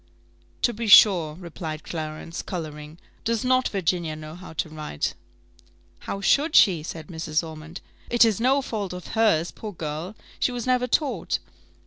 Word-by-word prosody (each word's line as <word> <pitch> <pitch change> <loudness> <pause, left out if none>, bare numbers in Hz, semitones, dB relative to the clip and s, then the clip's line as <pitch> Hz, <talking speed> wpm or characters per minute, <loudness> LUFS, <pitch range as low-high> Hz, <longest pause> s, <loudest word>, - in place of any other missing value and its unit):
"To 240 - +3
be 230 +1 -4
sure," 180 -7 +7
replied 160 -3 -7
Clarence, 155 0 -5
colouring. 155 -3 -7 0.3
"Does 230 +1 0
not 255 0 +3
Virginia 175 -4 -1
know 155 0 -9
how 180 +1 -10
to 160 - -2
write?" 155 - -3 0.9
"How 195 - -5
should 295 +10 +3
she?" 180 -6 +6
said 160 0 -7
Mrs. 160 -1 -2
Ormond: 160 +2 -9 0.3
"it 240 0 +6
is 225 -1 +1
no 270 +3 +3
fault 205 -7 -4
of 180 -1 -8
hers, 210 -8 +2
poor 215 -2 -8
girl 160 +4 -5 0.2
she - - +1
was 245 -2 -4
never 250 -1 +2
taught. 280 +3 0
180 Hz, 155 wpm, -25 LUFS, 155-225 Hz, 0.9 s, sure